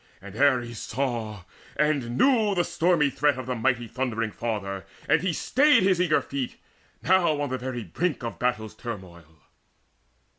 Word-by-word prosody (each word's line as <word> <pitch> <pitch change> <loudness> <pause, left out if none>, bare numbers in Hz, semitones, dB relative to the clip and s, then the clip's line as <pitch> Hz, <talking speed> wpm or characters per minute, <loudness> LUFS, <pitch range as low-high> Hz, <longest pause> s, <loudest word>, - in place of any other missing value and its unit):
And 100 +1 -11
Ares 120 -3 +2
saw, 115 -6 -3 0.3
and 140 -5 0
knew 225 -7 +3
the 175 - +2
stormy 165 -4 +2
threat 145 +1 +1
Of 130 - -5
the 125 - -2
mighty 120 0 0
thundering 115 -3 -2
Father, 100 -4 -4 0.2
and 160 - +3
he 185 0 0
stayed 275 - +3
His 185 -2 +3
eager 165 -4 +2
feet, 135 -3 -4 0.5
now 170 -5 +3
on 145 -2 -1
the 130 0 -3
very 125 -2 -4
brink 150 - -2
Of 115 - -5
battle's 110 -4 -1
turmoil. 85 - -9
130 Hz, 155 wpm, -26 LUFS, 115-155 Hz, 0.5 s, knew